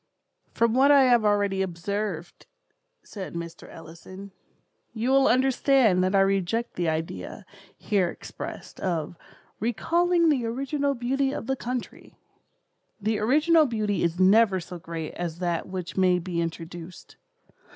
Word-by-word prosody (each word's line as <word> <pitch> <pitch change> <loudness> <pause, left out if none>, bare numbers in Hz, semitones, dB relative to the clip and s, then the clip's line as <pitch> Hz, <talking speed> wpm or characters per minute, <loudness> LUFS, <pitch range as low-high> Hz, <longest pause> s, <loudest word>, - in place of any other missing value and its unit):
"From 230 -1 +1
what 265 +3 +4
I 280 -2 +7
have 240 -3 +4
already 205 -2 +1
observed," 185 0 -4 0.6
said 190 -4 -8
Mr. 170 -1 -7
Ellison, 185 +4 -11 0.6
"you 235 +3 -1
will 270 0 +5
understand 255 -6 +3
that 185 +2 +1
I 195 - +5
reject 195 +4 0
the 175 -2 -1
idea, 155 - -5 0.3
here 195 -4 0
expressed, - - -9
of 170 -3 -2 0.4
'recalling 335 +9 +2
the 270 -5 +1
original 275 +4 -1
beauty 265 +3 0
of 280 - -5
the 265 +2 -1
country.' 250 -1 -6 0.8
The 215 +1 -1
original 305 +7 +4
beauty 215 -4 -1
is 170 +1 -1
never 195 +1 +5
so 175 0 -9
great 165 -1 -6
as 170 -2 -5
that 175 -2 -2
which 185 -2 -6
may 185 -1 +4
be 175 -1 -3
introduced. 165 +1 -7
200 Hz, 135 wpm, -26 LUFS, 175-250 Hz, 0.8 s, I